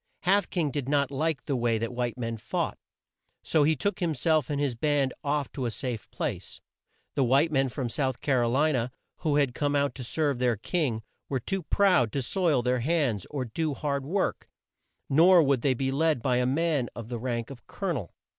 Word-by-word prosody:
Half 195 +1 +2
King 160 -6 0
did 140 -2 -3
not 140 -2 +2
like 150 0 -1
the 140 - -1
way 120 -2 +1
that 115 +2 -3
white 120 -1 -2
men 115 -2 -3
fought, 110 - -3 0.6
so 155 - +2
he 155 +2 +4
took 205 +8 -2
him 165 -3 0
self 155 0 +2
and 145 -1 -1
his 140 -3 0
band 140 +1 +1
off 145 -1 -1
to 130 -3 -3
a - - 0
safe 120 -2 -4
place. - - -4 0.5
The 135 - +2
white 135 +6 +3
men 135 -2 +2
from 130 0 -3
South 130 +1 -1
Car 130 -4 +1
o 120 - +1
li 145 +6 +3
na, 120 -4 0 0.3
who 150 -3 0
had 140 -4 +2
come 145 +1 0
out 140 0 +1
to 130 - -7
serve 140 +1 0
their 125 -3 +2
king, 120 - -1 0.3
were 135 - 0
too 195 - -3
proud 180 - +3
to 140 - 0
soil 155 -2 +1
their 125 +1 +1
hands 130 - 0
or 140 -3 -3
to 115 - -12
do 160 -3 0
hard 140 -2 -2
work, 185 +8 -2 0.6
nor 170 +4 +6
would 135 -4 +2
they 135 0 +2
be 135 +2 -1
led 150 -3 +1
by 125 -2 +2
a 125 0 +2
man 145 -2 +1
of 115 -1 -7
the 120 -2 -4
rank 120 0 -3
of 125 -3 -12
Col 195 -2 -4
o - - +2
nel. 115 - -5
140 Hz, 220 wpm, -28 LUFS, 125-155 Hz, 0.6 s, nor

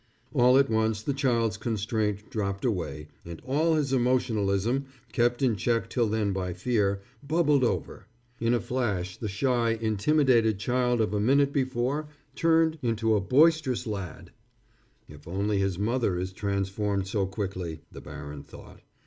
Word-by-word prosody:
All 125 -2 +5
at 135 0 +4
once 110 -2 0
the 140 - -1
child's 115 -5 +1
constraint 105 -1 -2
dropped 100 -3 -2
away, 75 - -3
and 85 -1 -8
all 155 +5 +2
his 140 -3 0
emotionalism, 120 -1 +1 0.3
kept 120 +2 +1
in 120 -4 +3
check 115 +4 -1
till 120 -3 +1
then 105 -2 0
by 90 -2 -3
fear, 100 0 0 0.2
bubbled 150 -2 +2
over. 120 - -2 0.3
In 115 +1 +2
a - - +1
flash 100 -9 -2
the 110 - -5
shy, 115 +2 +1
intimidated 115 0 +2
child 125 +2 +1
of 105 -2 0
a 105 - 0
minute 140 +6 +3
before 130 +2 -1 0.3
turned 160 +1 +2
into 115 -2 +1
a 105 - +1
boisterous 140 - +3
lad. 100 -7 -6 0.8
"If 75 +1 -14
only 100 +3 -1
his 95 -2 0
mother 110 -2 0
is 95 +1 -4
transformed 100 0 -2
so 100 0 -1
quickly," 95 -5 -5
the - - -10
baron 70 0 -8
thought. - - -14
110 Hz, 150 wpm, -27 LUFS, 100-130 Hz, 0.8 s, All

